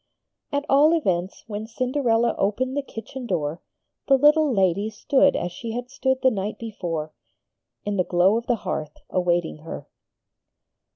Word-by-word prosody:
At 285 0 -1
all 295 +4 +5
events 185 - -1
when 215 0 -5
Cinderella 240 -1 +1
opened 250 +7 0
the 285 - +1
kitchen 255 0 -8
door 160 -3 -2 0.5
the 270 - +6
little 300 +1 +5
lady 195 -1 +2
stood 270 +6 +3
as 175 - -2
she 225 +5 -6
had 245 +2 -5
stood 265 -1 0
the 260 - +5
night 205 -1 -3
before, 170 -9 -4 0.7
in 205 -1 -1
the 180 - +3
glow 180 +4 +3
of 230 +1 -2
the 245 - +3
hearth, 155 -1 -3
awaiting 175 -3 0
her. 160 +2 -8
225 Hz, 155 wpm, -24 LUFS, 180-260 Hz, 0.7 s, the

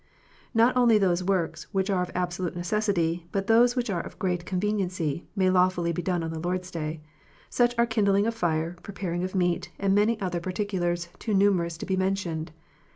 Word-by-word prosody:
Not 230 +3 +4
only 240 -3 +5
those 185 -3 +2
works 175 -4 -1
which 195 +1 +1
are 185 -2 +1
of 180 - -2
absolute 180 0 -2
necessity, 175 -3 0
but 195 -1 -1
those 240 +3 +5
which 245 -1 0
are 175 -3 -1
of - - -10
great 180 -2 -2
conveniency, 185 -5 -1
may 185 -2 +3
lawfully 180 -2 +2
be 170 - -2
done 175 -1 -1
on 165 - -3
the 160 - -5
Lord 180 +2 -1
s 180 0 -12
Day: 155 -2 -4 0.5
such 240 0 +2
are 235 - +4
kindling 205 -3 +2
of 230 - 0
fire, 170 -4 -1
preparing 180 -3 -4
of 185 +1 -4
meat, 175 -2 0
and 195 -1 +1
many 210 +2 +3
other 180 -3 -2
particulars 175 -2 -2
too 215 -3 -1
numerous 180 -4 +2
to - - -6
be 190 - 0
mentioned. 185 -4 -1
185 Hz, 195 wpm, -27 LUFS, 175-200 Hz, 0.5 s, only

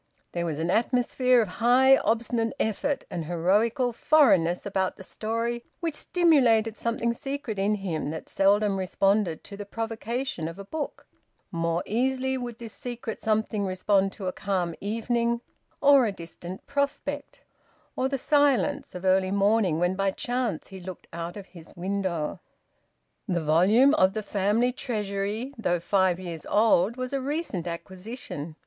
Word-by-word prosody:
There 170 -1 -2
was 155 -3 -3
an 165 +3 -1
atmosphere 245 +2 +3
of - - -5
high 260 +3 +6
obstinate 230 0 0
effort 275 +6 -1
and 170 -3 -3
heroical 210 - +1
foreign 250 - +5
ness 175 +2 -2
about 190 -2 -1
the - - -9
story 230 +4 -3 0.2
which 330 -3 -2
stimulated 250 - +3
something 235 0 -1
secret 275 -5 -4
in 205 +2 +2
him 180 -7 -3
that 160 +1 -6
seldom 200 0 +2
responded 195 -1 +1
to 200 - -9
the 205 - -6
provocation 225 -1 -3
of 165 +2 -7
a 200 - -8
book; 300 +7 -5 0.5
more 170 -1 -1
easily 260 +4 0
would 245 -3 -5
this 230 -3 -8
secret 240 -3 -6
something 215 -1 0
respond 195 +1 +1
to 195 - -7
a 185 - 0
calm 185 -4 -1
evening 235 +3 0 0.4
or 280 -4 +6
a - - -1
distant 175 0 -9
prospect, 280 0 -3 0.5
or 260 +1 0
the 275 - -1
silence 280 - +2
of 180 +1 -6
early 185 0 +3
morning 200 -3 +2
when 175 +2 +1
by 195 0 +1
chance 240 -4 -2
he 190 -1 -9
looked 185 0 -9
out 170 +3 -5
of 200 - -8
his 170 -4 -14
window. 185 -3 -2 0.9
The 175 - 0
volume 200 - +5
of 185 -7 +4
"The 215 0 -3
Family 210 +5 +1
Treasury," 215 0 -3
though 175 -5 +1
five 185 0 +2
years 170 -4 -7
old, 215 0 +3
was 255 +1 -4
a 275 - 0
recent 275 - -3
acquisition. 180 - -6
210 Hz, 155 wpm, -26 LUFS, 185-245 Hz, 0.9 s, high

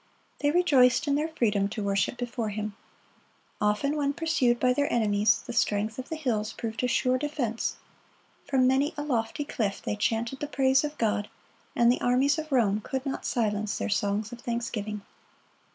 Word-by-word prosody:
They 290 - +2
rejoiced 290 -5 +4
in 285 - +2
their 300 +2 +1
freedom 210 -10 +1
to 215 0 -4
worship 200 +4 0
before 240 -2 -3
Him. 210 0 -4 0.9
Often 210 +8 +1
when 285 -1 0
pursued 305 -7 +1
by 250 0 +3
their 285 +2 0
enemies, 215 -2 +2
the - - -6
strength 215 0 0
of 260 - -6
the 320 - -3
hills 225 -8 -1
proved 225 +1 -4
a - - +3
sure 255 +1 +1
defense. 270 -6 -2 0.7
From 265 -2 +3
many 275 +5 +2
a 295 - -2
lofty 255 +1 -1
cliff 210 -7 -2
they - - -3
chanted 230 +4 -1
the 295 - -3
praise 265 -1 +3
of 300 0 -4
God, 210 -2 0 0.5
and 235 0 +5
the 250 - -1
armies 265 +5 +3
of 310 -1 -6
Rome 215 -5 +2
could 265 0 -3
not 275 - -3
silence 215 -3 -1
their - - -2
songs 205 +1 0
of 240 0 -9
thanksgiving. 215 -4 -3
240 Hz, 180 wpm, -27 LUFS, 215-280 Hz, 0.9 s, and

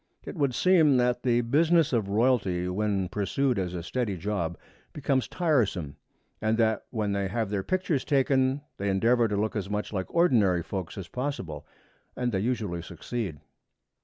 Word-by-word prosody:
It - - -7
would 140 -6 0
seem 160 -7 +5
that 125 0 +1
the 120 -2 +2
business 160 +5 +3
of 110 -5 +1
royalty 100 -5 +1
when 100 0 0
pursued 105 +5 0
as 90 -1 -3
a 85 - -4
steady 105 +2 -2
job 85 -3 -2 0.4
becomes 135 -3 0
tiresome, 115 - 0 0.5
and 110 +1 +1
that 110 -2 +1
when 105 -4 -2
they 100 -1 0
have 110 +1 -2
their 100 -2 0
pictures 185 - -1
taken 135 -1 +2 0.2
they 100 +1 -1
endeavor 115 +5 +3
to 105 -1 -2
look 110 +2 -1
as 100 -2 -3
much 105 +1 -3
like 95 -2 -2
ordinary 110 - +3
folks 95 0 -5
as 95 -3 -6
possible 110 - -4 0.5
and 125 -1 -1
they 95 - 0
usually 105 -6 -2
succeed. 90 - -5
110 Hz, 165 wpm, -27 LUFS, 95-130 Hz, 0.5 s, seem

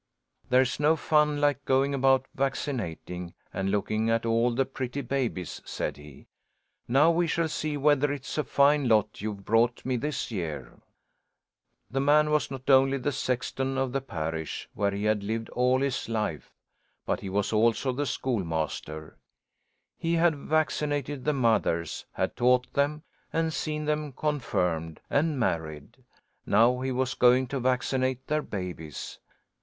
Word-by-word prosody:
"There's 130 +1 +3
no 150 +2 +4
fun 150 -1 +2
like 145 -2 +1
going 135 +1 +2
about 135 -1 +3
vaccinating 100 - -3 0.2
and 95 0 -1
looking 110 +2 0
at 115 0 +1
all 115 +1 +3
the 130 +3 +1
pretty 135 +1 -4
babies," 120 - -3
said - - -3
he. 75 -2 -13 0.6
"Now 140 +7 +5
we 170 +1 +1
shall 165 0 +1
see 155 -1 -2
whether 145 0 +3
it's 140 -2 -5
a - - +2
fine 140 -1 +3
lot 105 -3 +2
you've 100 -2 -5
brought 115 +2 +2
me 130 -1 0
this 150 0 -3
year." 85 -8 -5 1.1
The 135 - 0
man 150 +2 +4
was 150 0 +1
not 135 -1 -8
only 135 0 +5
the 135 +2 -1
sexton 130 +1 -2
of 135 -1 0
the 135 +1 -1
parish, 80 -8 -4
where 100 0 +1
he 100 +1 -3
had 105 -1 +2
lived 115 +3 -3
all 125 +1 +2
his 135 -4 -1
life, 105 -10 -2 0.5
but - - -1
he 95 - -6
was 100 +3 -1
also 115 +4 +2
the 145 +3 -2
schoolmaster. 80 - -3 0.8
He 165 0 0
had 165 -1 +3
vaccinated 145 -2 -1
the 150 - +2
mothers, 110 - 0
had - - -2
taught 125 0 +2
them, 150 +2 0 0.3
and 160 0 0
seen 150 -1 -2
them 150 -1 -1
confirmed 90 - -1
and 150 -1 +1
married. 80 - -2 0.5
Now 120 +4 +4
he 130 0 -1
was 130 +1 0
going 125 +1 +4
to 140 - -2
vaccinate 130 +1 0
their 150 +2 0
babies. 90 - -6
130 Hz, 150 wpm, -28 LUFS, 105-145 Hz, 1.1 s, Now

